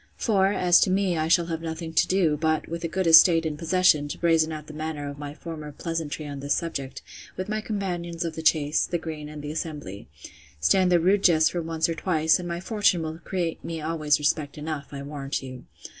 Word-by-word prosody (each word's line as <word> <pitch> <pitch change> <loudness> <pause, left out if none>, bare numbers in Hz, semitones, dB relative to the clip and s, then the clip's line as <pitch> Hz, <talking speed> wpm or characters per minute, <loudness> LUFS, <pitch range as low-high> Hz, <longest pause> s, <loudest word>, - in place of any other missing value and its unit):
For, 195 -4 +2
as 180 -3 +4
to - - +2
me, 190 -1 +1
I 155 -1 0
shall 170 +1 +3
have 165 -1 -4
nothing 160 0 -5
to - - +3
do, 180 -5 +2
but, 155 +1 0
with 170 +1 -5
a - - 0
good 185 +3 -2
estate 165 0 +7
in 155 -1 -2
possession, 165 -2 +2
to 145 - -6
brazen 165 -2 +2
out 155 -1 -6
the 155 - -11
matter 155 -1 -5
of 140 0 -7
my 145 0 -7
former 155 -3 -8
pleasantry 160 0 -4
on 145 -1 -6
this 140 +1 0
subject, 140 -6 -5 0.3
with 185 - -4
my 215 0 -2
companions 175 -5 -4
of 165 - -3
the 160 - -6
chase, 155 -1 +2
the 175 - -1
green, 155 -2 -7
and 150 -1 -9
the 150 - -4
assemblee; 150 - -6 0.5
stand 185 - +3
their 175 - +5
rude 190 +4 +3
jests 160 -3 +5
for 175 - -2
once 160 0 -1
or 165 - -1
twice, 160 -1 +2
and 175 - -6
my 170 0 -3
fortune 190 -3 +1
will 160 +1 -5
create 175 -3 -3
me 165 -1 -5
always 155 -1 +1
respect 150 0 -1
enough, 150 -1 -5
I 140 -1 -6
warrant 140 -1 -4
you. 130 -1 -9
160 Hz, 225 wpm, -25 LUFS, 150-175 Hz, 0.5 s, estate